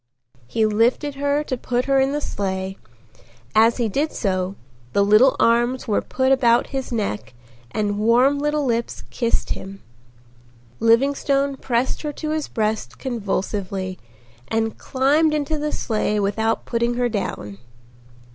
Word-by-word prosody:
He 220 - +1
lifted 230 +7 +1
her 285 +1 0
to 265 - -3
put 245 0 -1
her 275 0 +3
in 265 +1 +2
the 295 +1 -2
sleigh. 190 -3 -3 0.8
As 225 +1 +5
he 235 -2 +1
did 285 +9 -1
so 185 -2 -1 0.4
the 200 - +3
little 215 +6 +5
arms 240 +3 +2
were 210 - +1
put 260 0 0
about 240 -3 +3
his 265 -1 -3
neck 120 - -3 0.3
and 205 - -1
warm 245 +6 +4
little 295 0 0
lips 235 -2 -2
kissed 235 -2 0
him. 195 +1 -7 1.0
Livingstone 275 +4 +2
pressed 250 -1 -1
her 300 - -3
to 305 +1 -4
his 310 -1 -1
breast 215 -1 -2
convulsively 195 -5 -3 0.5
and 225 0 -1
climbed 295 +4 +2
into 300 +1 -1
the 300 0 -2
sleigh 210 -2 -1
without 220 +3 0
putting 235 0 0
her 245 0 +1
down. 105 - -4
235 Hz, 140 wpm, -22 LUFS, 210-275 Hz, 1.0 s, As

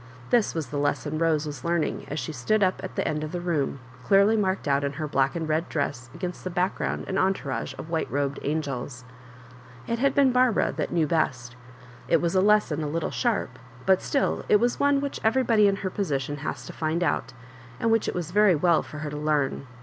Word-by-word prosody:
This 235 -7 +3
waa 165 - 0
the 145 0 -4
lesson 145 +1 -1
Rose 160 -2 +2
was 145 -4 -7
learning 170 -1 -1
as 150 - -3
she - - -4
stood 200 - +1
up 185 0 0
at - - -6
the - - -1
end 150 0 -1
of 155 - -5
the 180 - -3
room, 155 -6 -1 0.2
clearly 200 +2 +4
marked 190 -5 0
out 140 0 +2
in 140 0 -1
her 155 +1 -4
black 135 -1 +1
and 165 -2 -2
red 160 +2 0
dress 130 -5 -3
against 180 +1 -5
the 185 - -3
background 180 +1 -1
and 190 - -1
entourage 190 -8 -1
of 165 - -8
white 160 -1 -1
robed 140 -1 -1
angels. 140 -4 -3 0.8
It 235 0 -2
had 275 +1 +2
been 275 -2 +5
Barbara 250 -3 +3
that - - -3
knew 165 -2 +2
best. 130 -6 -1 0.5
It 165 - +4
was 170 +1 0
a 185 - +4
lesson 205 -7 +3
a 150 - -2
little 165 +2 -2
sharp, 215 - -1 0.3
but 190 -1 +4
still 280 - 0
it - - +6
was 240 +2 0
one 285 -1 +3
which 280 -1 -4
every 255 +4 +3
body 220 -4 +4
in 200 - +2
her 190 - -1
position 145 -8 -2
has 135 -3 -5
to - - -8
find 160 +2 -1
out, 135 -5 -1 0.5
and 230 - +1
which 225 -1 +2
it - - -2
was 175 -2 -3
very 205 -2 +5
well 170 +1 +3
for 155 - -10
her 150 - -4
to 150 - -5
learn. 150 -3 0
165 Hz, 225 wpm, -26 LUFS, 145-200 Hz, 0.8 s, it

